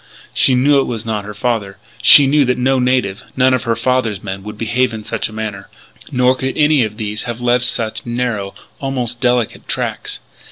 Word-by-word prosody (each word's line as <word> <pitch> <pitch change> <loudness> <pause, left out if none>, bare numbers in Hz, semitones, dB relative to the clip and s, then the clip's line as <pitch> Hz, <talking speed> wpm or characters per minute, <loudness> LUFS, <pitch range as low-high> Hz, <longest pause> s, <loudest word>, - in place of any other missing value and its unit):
She 130 - +4
knew 140 +3 +4
it 135 - +1
was 115 -2 -4
not 105 -2 -3
her 105 0 -8
father. 105 -4 -2 0.2
She 145 - +8
knew 145 +2 +3
that 125 0 0
no 130 +1 +1
native 125 -6 0 0.2
none 130 0 +4
of 130 0 -1
her 115 -1 +1
father's 115 -4 -1
men 95 -1 -5
would 105 +1 -9
behave 120 +2 0
in 110 - -7
such - - -3
a - - -12
manner. 110 -3 -6 0.4
Nor 125 0 +3
could 130 0 -4
any 150 -3 +4
of 105 -1 -5
these 105 0 -4
have 120 -1 -5
left 125 0 +2
such 115 -3 0
narrow, 120 -5 -3 0.2
almost 125 -3 -3
delicate 125 -3 0
tracks. - - -3
120 Hz, 200 wpm, -17 LUFS, 110-130 Hz, 0.4 s, She